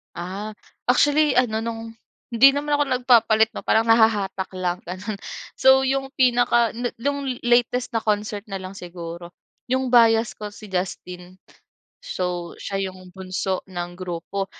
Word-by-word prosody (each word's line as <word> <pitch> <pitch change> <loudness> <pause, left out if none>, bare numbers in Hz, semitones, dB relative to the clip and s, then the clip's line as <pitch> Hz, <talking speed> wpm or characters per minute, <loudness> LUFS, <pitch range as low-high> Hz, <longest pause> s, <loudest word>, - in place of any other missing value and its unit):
Ah, 195 +5 -6 0.3
actually 290 +3 +3
ano 230 -3 +2
nung 225 0 -5 0.4
hindi 270 +4 +6
naman 295 +1 -2
ako 290 0 +3
nagpapalit 230 -4 +3
'no - - -9
parang 220 - +4
nahahatak 215 -4 +2
lang 180 -1 -2
ganun, 190 +3 -5 0.4
so 265 0 +6
yung 270 0 0
pinaka 245 -2 +3
nu 240 +1 -3
nung 280 +3 -2 0.2
latest 245 +1 +2
na 225 - 0
concert 210 -1 -1
na 195 - -5
lang 185 -1 -6
siguro, 175 -2 -9 0.3
yung 260 0 -1
bias 230 -2 +5
ko 210 -1 -9
si 210 -3 -12
Justin, 180 0 -5 0.7
so 180 -2 -3
siya 195 -1 -2
yung 185 -1 -14
bunso 185 0 -4
ng 175 -2 -6
grupo 185 +2 -4
215 Hz, 145 wpm, -23 LUFS, 185-245 Hz, 0.7 s, hindi